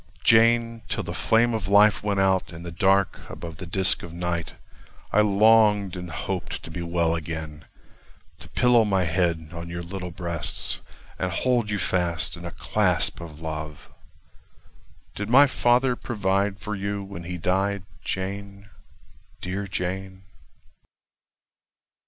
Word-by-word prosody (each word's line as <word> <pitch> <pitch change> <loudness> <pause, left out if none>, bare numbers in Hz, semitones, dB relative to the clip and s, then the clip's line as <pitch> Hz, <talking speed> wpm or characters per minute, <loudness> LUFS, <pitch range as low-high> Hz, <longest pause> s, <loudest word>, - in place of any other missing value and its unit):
Jane, 115 0 +4
till - - -1
the - - -5
flame 115 +1 +2
of 110 - -2
life 105 +1 +5
went 100 -1 0
out 95 -2 +2
In 85 0 -9
the 85 - -6
dark 95 +2 +2
above 80 -2 -8
the 90 - -8
disk 95 +2 +3
of 85 - -9
night 85 -1 -3 0.6
I 105 - +5
longed 105 -2 +4
and 90 -1 -6
hoped - - -4
to 85 - -9
be 85 - -5
well 85 -1 0
again 80 -2 -5 0.7
To 85 -1 -13
pillow 120 +2 +4
my 95 -3 +1
head 85 -2 0
on 85 0 -7
your 85 0 -5
little 90 +1 -6
breasts, 85 -2 -3 0.4
And 95 -1 -1
hold 120 +4 +1
you 105 - 0
fast 90 -3 -1
in 85 0 -9
a 85 - -5
clasp - - +1
of 80 -2 -10
love— 75 -2 -6 1.2
Did 105 +1 -5
my 135 +4 +8
father 125 -1 +2
provide 100 -3 -1
for 105 - -5
you 100 0 -3
when 95 -3 -8
he 90 +1 -4
died, 95 +3 0 0.2
Jane, 100 +2 -5 0.7
dear 95 +2 -4
Jane? 95 0 -4
95 Hz, 145 wpm, -25 LUFS, 85-105 Hz, 1.2 s, my